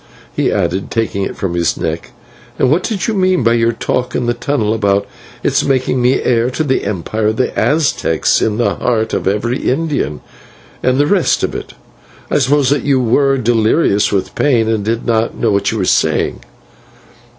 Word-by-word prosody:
he - - +1
added, 95 +2 -1
taking 110 -3 -1
it 95 - -4
from 95 -3 -2
his 85 -1 0
neck; 80 0 -4 0.5
"and 130 - +2
what 165 +5 +3
did 195 -2 -2
you 225 - 0
mean 185 - +2
by 115 +1 +3
your 115 0 +2
talk 125 +2 -2
in - - -1
the 120 - +1
tunnel 120 -3 -1
about 100 -2 +1 0.4
its - - +1
making 130 -1 0
me 125 +2 +3
heir 120 0 +2
to 145 +5 -2
the 130 -3 0
empire 105 +2 -2
of 110 +1 0
the 130 - -1
Aztecs 140 - +1
in 110 -1 0
the 120 - +1
heart 110 -2 -1
of - - -1
every 110 +6 0
Indian, 140 - -1 0.6
and 130 0 +1
the 145 - +3
rest 180 +3 +1
of - - -1
it? - - -7 0.6
I - - +3
suppose 140 0 +2
that 145 - +2
you 140 -2 +2
were 135 +3 +2
delirious 115 -2 +2
with 100 -2 -1
pain, 120 -6 +2
and 110 -2 0
did 115 +2 -2
not 115 -1 0
know 115 - +1
what 100 0 +1
you 110 - -3
were 95 - 0
saying." - - +1
120 Hz, 195 wpm, -15 LUFS, 110-135 Hz, 0.6 s, what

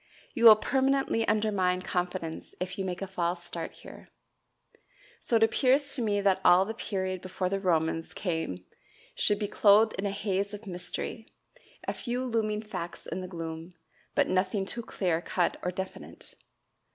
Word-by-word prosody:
You 235 -3 +1
will 220 -2 +12
permanently 265 0 +1
undermine 190 -4 +1
confidence 180 -3 -3
if 185 +1 -4
you - - 0
make 180 +1 -3
a - - -4
false 175 -1 -2
start 170 -1 -6
here. - - -13 1.1
So 235 - 0
it 225 - +5
appears 270 +5 +3
to 265 - -1
me 205 -3 +1
that 190 -1 +2
all 180 +2 +6
the 220 - -4
period 185 -4 -3
before 185 0 -2
the 195 +1 -1
Romans 165 -3 0
came 160 - -3 0.5
should 205 - +1
be 205 0 -2
clothed 215 +2 +5
in 200 - 0
a - - 0
haze 200 0 -2
of 210 +2 -11
mystery, 180 +4 -5 0.6
a - - 0
few 245 +1 -3
looming 220 -3 -1
facts 180 -5 -6
in 185 - -4
the 185 - -6
gloom, 165 0 -7 0.4
but - - +3
nothing 190 +2 +1
too 235 +4 -5
clear 180 -7 -1
cut 175 0 0
or 180 - -1
definite. 190 +1 -7
190 Hz, 165 wpm, -29 LUFS, 180-215 Hz, 1.1 s, will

